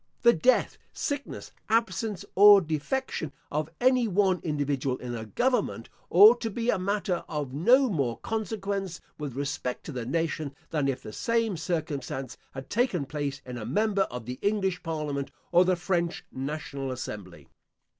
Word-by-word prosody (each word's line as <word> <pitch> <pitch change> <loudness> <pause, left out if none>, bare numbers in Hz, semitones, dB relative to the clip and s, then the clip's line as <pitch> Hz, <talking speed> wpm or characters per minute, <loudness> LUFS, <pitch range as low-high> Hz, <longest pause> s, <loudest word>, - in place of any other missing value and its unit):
The 235 0 +7
death, 255 +11 +2
sickness, 285 -1 -4 0.2
absence 225 -3 0
or 205 +1 +9
defection, 160 - -2 0.2
of 150 +1 -1
any 255 -1 +4
one 190 -2 +2
individual 140 -4 -1
in 125 -1 -6
a 110 -2 -5
government, 250 - 0 0.2
ought 430 +3 +8
to 225 - -1
be 230 +3 0
a 200 - 0
matter 195 -1 -1
of 145 -5 -3
no 250 - +5
more 140 - -1
consequence, 200 -4 -3 0.2
with 145 -5 -5
respect 140 -2 -3
to - - -7
the 125 -4 -5
nation, 155 -1 -1 0.2
than 150 -4 +1
if 135 -2 -2
the 105 - -8
same 230 - 0
circumstance 145 -6 -3 0.2
had 135 0 -7
taken 210 - +1
place 145 -1 -4
in 125 -1 -6
a 105 - -5
member 200 - +1
of 120 -2 -6
the 125 +2 -6
English 195 -3 0
Parliament, 150 -4 -3 0.2
or 175 +1 +6
the 185 0 +3
French 175 -1 -1
National 140 0 -4
Assembly. 95 - -7
165 Hz, 155 wpm, -28 LUFS, 135-205 Hz, 0.2 s, or